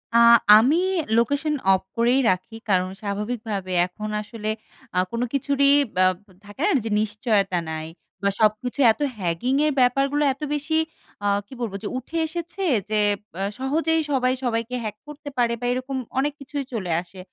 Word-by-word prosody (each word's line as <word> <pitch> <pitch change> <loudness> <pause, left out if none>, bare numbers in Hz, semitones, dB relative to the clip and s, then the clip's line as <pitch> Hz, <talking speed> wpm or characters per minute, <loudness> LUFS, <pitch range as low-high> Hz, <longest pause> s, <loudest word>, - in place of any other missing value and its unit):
আ - - +7 0.4
আমি 260 +9 +4 0.4
location 285 +6 +1 0.2
of 190 - +1 0.2
করেই 240 +3 +3
রাখি। 185 +5 -2
কারণ 185 -1 +2
স্বাভাবিকভাবে 210 -1 -3 0.2
এখন 210 +4 -7
আসলে 215 0 -6 0.5
আ - - 0
কোনো 235 +1 -1
কিছুরই 280 0 +2 0.2
বা, 185 - +4 0.4
থাকে 205 +6 -10
না? - - +3 0.2
যে, - - -2
নিশ্চয়তা 210 -3 0
নাই। 155 0 -4 0.4
বা, 200 - +4
সবকিছু 220 +5 +1
এত 220 - -5
hacking 280 -3 0
এর - - -20
হ্যাগিঙ্গের 250 - +1
ব্যাপারগুলো 275 +4 +2
এত 275 - -24
বেশি 295 +2 0 0.5
আ - - +3 0.2
কি - - -13
বলবো? 220 -5 -3
যে - - -2
উঠে 260 +6 -5
এসেছে 345 +4 -5 0.3
যে 215 -1 +1 0.4
আ - - -2 0.2
সহজেই 320 +4 +1
সবাই 255 -2 +2
সবাইকে 230 0 -1
hack 215 -1 -4
করতে 295 0 -8
পারে 240 -1 +2
বা, 245 - -4
এরকম 255 +2 -3 0.2
অনেক 290 +2 0
কিছুই 280 0 -5
চলে 190 -7 -3
আসে। 185 +1 -14
240 Hz, 165 wpm, -23 LUFS, 210-280 Hz, 0.5 s, আ